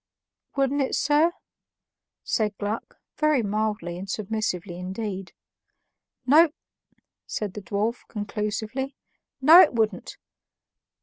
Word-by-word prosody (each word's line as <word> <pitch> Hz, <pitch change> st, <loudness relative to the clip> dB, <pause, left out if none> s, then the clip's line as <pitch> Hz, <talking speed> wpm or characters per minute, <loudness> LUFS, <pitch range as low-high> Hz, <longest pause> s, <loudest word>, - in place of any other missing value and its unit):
"Wouldn't 275 Hz, +1 st, +1 dB
it, 265 Hz, -, 0 dB
sir?" 300 Hz, +4 st, +3 dB, 0.9 s
said 210 Hz, -2 st, -1 dB
Gluck 210 Hz, +2 st, -4 dB, 0.2 s
very 305 Hz, -5 st, +3 dB
mildly 210 Hz, -4 st, -2 dB
and 195 Hz, +1 st, -7 dB
submissively 195 Hz, -4 st, -3 dB
indeed. 190 Hz, 0 st, -5 dB, 0.9 s
"No," 310 Hz, +6 st, +6 dB, 0.8 s
said 205 Hz, -3 st, -3 dB
the 210 Hz, -, -6 dB
dwarf, 205 Hz, +6 st, -2 dB
conclusively, 215 Hz, +5 st, -3 dB, 0.5 s
"no, 320 Hz, +7 st, +10 dB
it 300 Hz, -, +4 dB
wouldn't." 215 Hz, -5 st, -1 dB
215 Hz, 100 wpm, -25 LUFS, 200-265 Hz, 0.9 s, no